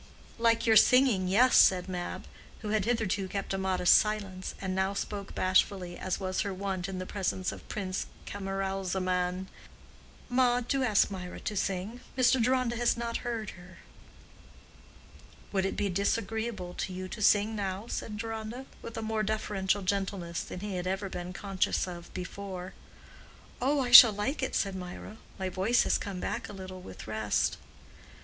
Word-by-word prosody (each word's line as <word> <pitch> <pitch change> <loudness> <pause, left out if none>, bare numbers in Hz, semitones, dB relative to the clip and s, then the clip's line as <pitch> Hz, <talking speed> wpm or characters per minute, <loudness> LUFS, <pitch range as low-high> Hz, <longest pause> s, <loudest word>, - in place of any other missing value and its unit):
"Like 230 0 +3
your 220 -1 +6
singing—yes," 245 -2 +5
said 185 -1 +6
Mab, 180 -1 -5 0.4
who 215 - -4
had 210 -2 +1
hitherto 215 -5 0
kept 195 0 -3
a - - 0
modest 185 -2 +4
silence, 200 -3 0
and 190 -1 -3
now 190 +1 0
spoke 200 -1 -5
bashfully, 185 -1 +1
as 185 0 -3
was 185 -1 -1
her 200 - -2
wont 190 -1 -3
in 190 - -4
the 185 - -4
presence 185 -1 -2
of - - -11
Prince 190 -3 -3 0.2
Camaralzaman—"Ma, 195 +5 -2
do 270 +3 -1
ask 215 -5 +3
Mirah 180 -2 -6
to 210 - -3
sing. 195 +4 -2 0.2
Mr. 250 -1 +4
Deronda 250 -1 +1
has 240 0 +2
not 235 0 -2
heard 230 -4 -4
her." 180 0 -14 1.7
"Would 190 -1 +1
it - - -4
be 205 - +1
disagreeable 200 0 -2
to - - -2
you 185 0 -5
to 215 - -7
sing 210 +2 +4
now?" 195 0 -3
said 215 -2 -5
Deronda, 225 +3 -5 0.2
with 230 - -8
a 225 - -3
more 220 0 -1
deferential 205 -2 -1
gentleness 190 -3 -2
than 180 - -7
he 200 -2 -4
had 180 0 -3
ever 195 +1 -2
been 180 0 -5
conscious 195 0 -1
of 175 -1 -8
before. 185 0 -6 0.9
"Oh, 280 +3 +2
I 245 -2 -2
shall 235 -2 +12
like 210 +10 -2
it," 260 - -2
said 195 -1 0
Mirah. 185 +3 -8 0.2
"My 190 - -2
voice 195 +6 +2
has - - +1
come 195 -3 -5
back - - -3
a - - -8
little 185 -1 -8
with 95 - -10
rest." 110 -1 0
195 Hz, 165 wpm, -30 LUFS, 185-220 Hz, 1.7 s, shall